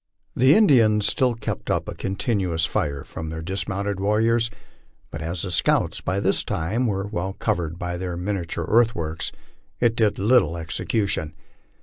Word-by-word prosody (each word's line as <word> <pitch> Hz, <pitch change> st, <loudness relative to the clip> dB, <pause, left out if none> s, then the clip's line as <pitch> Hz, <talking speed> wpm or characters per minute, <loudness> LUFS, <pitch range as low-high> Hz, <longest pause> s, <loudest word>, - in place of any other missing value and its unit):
The 130 Hz, +5 st, +5 dB
Indians 115 Hz, -, +5 dB
still 125 Hz, -2 st, +2 dB
kept 115 Hz, -, -5 dB
up -, -, 0 dB
a -, -, -4 dB
continuous 95 Hz, -5 st, -1 dB
fire 70 Hz, -4 st, -2 dB
from 80 Hz, -1 st, -7 dB
their 80 Hz, 0 st, -5 dB
dismounted 95 Hz, +2 st, -3 dB
warriors; 115 Hz, +3 st, +2 dB, 0.6 s
but -, -, -6 dB
as 85 Hz, +2 st, -3 dB
the 95 Hz, -, -3 dB
scouts 85 Hz, -, +2 dB
by 95 Hz, +3 st, -1 dB
this 100 Hz, 0 st, +1 dB
time 110 Hz, +10 st, -1 dB
were 100 Hz, -2 st, -1 dB
well 95 Hz, -2 st, -3 dB
covered 85 Hz, -7 st, -2 dB
by 90 Hz, 0 st, -3 dB
their 90 Hz, -1 st, -4 dB
miniature 90 Hz, -3 st, -3 dB
earth 115 Hz, +1 st, +4 dB
works, 80 Hz, 0 st, -3 dB, 0.5 s
it 120 Hz, -2 st, +2 dB
did 110 Hz, -3 st, +2 dB
little 100 Hz, -6 st, +3 dB
execution. 80 Hz, -1 st, -1 dB
95 Hz, 155 wpm, -23 LUFS, 85-110 Hz, 0.6 s, The